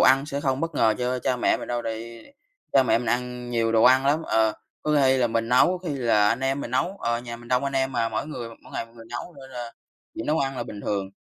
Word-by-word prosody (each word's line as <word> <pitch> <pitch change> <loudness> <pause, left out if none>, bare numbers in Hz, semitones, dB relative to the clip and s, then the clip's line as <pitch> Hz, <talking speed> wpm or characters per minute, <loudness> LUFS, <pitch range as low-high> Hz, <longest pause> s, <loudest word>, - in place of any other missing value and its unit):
ăn 135 +2 +5
sẽ 140 -1 -3
không 135 -2 0
bất 165 -1 -2
ngờ 110 -5 +3
cho 125 +1 0
cha 125 0 0
mẹ 120 - +2
mình - - -8
đâu, 120 0 -1
tại 115 - -2
vì 115 - -10 0.4
cha 135 - +6
mẹ 125 - +3
mình 120 - -5
ăn 125 0 -2
nhiều 115 -1 +1
đồ 110 -1 +4
ăn 130 +2 +6
lắm. 150 +3 +2
Ờ, 110 -1 +3 0.3
có 150 0 +1
khi 130 0 +4
là 125 -2 +3
mình 115 0 -1
nấu, 125 +1 +6
có 180 -1 -6
khi 145 - -1
là 115 -6 +3
anh 115 +4 0
em 135 +1 0
mình 120 - -5
nấu, 175 +10 0
ờ, 120 0 0
nhà 120 -1 -7
mình 120 0 -14
đông 125 +2 +2
anh 140 - -2
em 135 0 0
mà, 115 -2 +1
mỗi 110 +4 -3
người 125 -6 -6
mỗi 115 - -15
ngày 115 - -3
một 115 - -23
người 115 -1 -12
nấu, 120 +8 -6
nên 135 0 -12
là 120 -2 -6 0.4
chuyện - - -5
nấu 155 +2 +2
ăn 135 -2 -1
là 120 - -2
bình 105 -3 -8
thường. 100 -2 -2
125 Hz, 295 wpm, -25 LUFS, 115-135 Hz, 0.4 s, cha